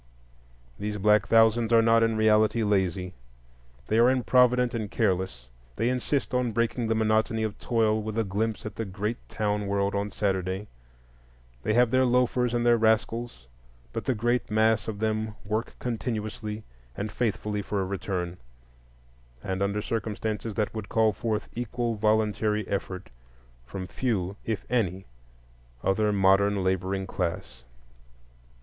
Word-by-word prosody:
These 105 0 -3
black 105 0 +3
thousands 115 0 +4
are 115 -1 +6
not 115 0 +5
in 115 -1 +2
reality 110 +1 +3
lazy; 95 -3 0 0.7
they 110 - +1
are 120 +2 +6
improvident 125 -1 +3
and 110 -3 -3
careless; 95 - -1 0.3
they 115 +3 +1
insist 130 +1 -1
on 125 -2 +1
breaking 115 +1 0
the 115 - +1
monotony 110 +1 +1
of 105 -2 -3
toil 110 -2 +1
with 110 +1 -5
a 115 - +2
glimpse 110 +3 -2
at 105 -1 -6
the 115 - -1
great 105 +4 -3
town 105 -1 -1
world 100 0 0
on 100 +1 -1
Saturday; 95 -1 -1 1.0
they 110 - 0
have 120 -1 +4
their 130 0 +4
loafers 125 -1 +2
and 120 0 0
their 120 -1 +5
rascals; 110 - 0 0.5
but - - -4
the 130 - +1
great 120 +3 0
mass 110 0 +2
of 110 -2 -3
them 110 0 -1
work 110 +3 -2
continuously 110 -3 -4 0.3
and 105 +1 -3
faithfully 105 -3 -1
for 100 0 -2
a 95 - 0
return, 90 -2 -3 1.1
and 95 0 -3
under 100 +1 0
circumstances 110 0 -3
that 105 -2 -1
would 110 -2 -6
call 110 -1 +3
forth 110 0 -2
equal 120 0 -2
voluntary 105 0 +1
effort 95 -1 -4 0.6
from 95 +8 -5
few 100 -4 -2
if 110 -3 -3
any 95 -6 0 0.8
other 105 +2 +2
modern 100 0 +3
laboring 95 +1 -1
class. 90 -9 -4
110 Hz, 145 wpm, -27 LUFS, 100-115 Hz, 1.1 s, are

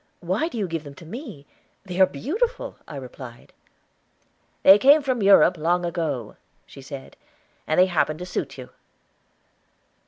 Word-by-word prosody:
Why 190 - -1
do 290 - -7
you 205 -4 -1
give 165 -2 -4
them 140 -2 -11
to 170 - -13
me? 215 - -9 0.4
They 185 0 -2
are 190 - +7
beautiful," 435 - -3
I - - -9
replied. 125 -2 -10 1.1
"They 195 +2 +8
came 285 +4 +6
from 255 -4 -1
Europe 195 -3 +5
long 175 +3 +1
ago," 155 -10 -3 0.3
she 135 - -13
said. 135 0 -10 0.5
"And 155 - +1
they 185 - +7
happen 160 -4 0
to 180 - -7
suit 140 -6 -4
you." 130 -1 -9
175 Hz, 155 wpm, -24 LUFS, 145-205 Hz, 1.1 s, They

